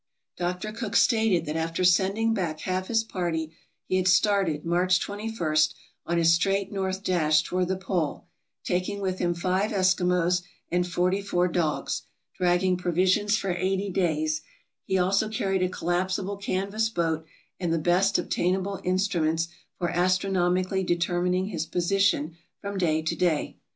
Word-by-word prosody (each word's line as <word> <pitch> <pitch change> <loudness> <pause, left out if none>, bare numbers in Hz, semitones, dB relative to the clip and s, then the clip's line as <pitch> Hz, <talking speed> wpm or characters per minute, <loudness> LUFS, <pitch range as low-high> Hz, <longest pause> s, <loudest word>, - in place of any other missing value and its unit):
Dr. 180 +4 -3
Cook 220 -2 -5
stated 220 - +3
that 150 +1 -4
after 165 +2 -1
sending 195 +5 +3
back 170 -7 -2
half 185 0 -2
his 225 -1 +2
party 165 -6 -3 0.3
he 185 - 0
had 185 0 +1
started, 185 -5 +2
March 180 +2 +2
21, 205 -7 -3 0.5
on 170 - 0
his 165 0 +5
straight 195 +3 +1
north 190 -1 -2
dash 155 -5 +3
toward 180 +1 -1
the 190 +1 -1
pole, 185 -5 -2 0.4
taking 185 +3 -1
with 185 -2 -2
him 175 -1 0
five 185 +4 0
Eskimos 180 -2 +2 0.3
and 180 +1 +1
forty 180 +3 0
four 180 -3 +1
dogs, 165 -3 -1 0.3
dragging 180 +1 +2
provisions 185 +4 +2
for 195 -3 -2
eighty 190 +2 -1
days; 155 -4 0 0.4
he 190 - +1
also 195 +4 +2
carried 195 -3 -1
a 185 - +1
collapsible 185 +3 -2
canvas 200 +3 -1
boat 165 -6 -1 0.4
and 175 -3 -1
the 165 - +2
best 180 +4 +2
obtainable 185 +2 -1
instruments 170 -3 0 0.3
for 175 - -1
astronomically 185 +1 +1
determining 180 +1 0
his 165 -5 -3
position 175 -2 +1 0.2
from 200 -1 -4
day 160 -3 +1
to 160 - -1
day. 170 -4 0
180 Hz, 145 wpm, -26 LUFS, 175-195 Hz, 0.5 s, his